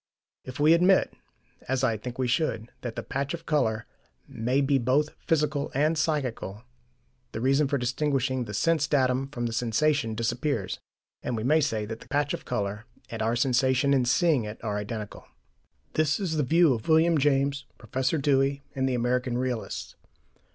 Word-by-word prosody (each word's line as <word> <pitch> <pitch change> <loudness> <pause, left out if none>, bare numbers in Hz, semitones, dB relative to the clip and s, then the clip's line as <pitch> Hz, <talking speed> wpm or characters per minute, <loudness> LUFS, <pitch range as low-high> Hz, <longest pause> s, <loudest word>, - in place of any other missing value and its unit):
If 130 +1 -8
we 155 +2 +6
admit 180 +3 +4 0.5
as 130 0 0
I 115 -4 +2
think 120 +3 -7
we 130 -1 0
should 120 -4 -1
that 120 -2 -5
the - - -4
patch 140 +4 -3
of 165 0 -13
colour 110 -8 0 0.4
may 125 +5 -1
be 140 -1 +2
both 135 +5 +2 0.2
physical 150 -2 +1
and 155 +4 +2
psychical, 130 - -2 0.7
the - - -3
reason 135 +4 +2
for 140 +1 0
distinguishing 130 0 0
the 105 - -7
sense 160 +5 +2
datum 130 -2 +1
from 120 -4 -4
the 115 - -2
sensation 120 +1 +1
disappears, 115 -1 -2 0.4
and 120 - -3
we 110 - -3
may 155 +6 +3
say 110 -7 -1
that 115 +1 -6
the - - -15
patch 145 0 0
of - - -6
colour 105 -2 -3 0.3
and 115 -1 -4
our 115 +2 +1
sensation 130 +2 +2
in 130 -3 +3
seeing 150 0 +3
it 105 0 -6
are 105 -2 -2
identical. 105 0 -6 0.7
This 155 0 +1
is 180 -5 -2
the 155 - +1
view 160 +2 +4
of 110 -3 -5
William 160 0 +4
James, 140 0 +1
Professor 130 +7 -1
Dewey, 140 -1 +1
and 130 0 0
the 130 - 0
American 125 +1 0
realists. 125 -3 -3
130 Hz, 175 wpm, -27 LUFS, 120-150 Hz, 0.7 s, we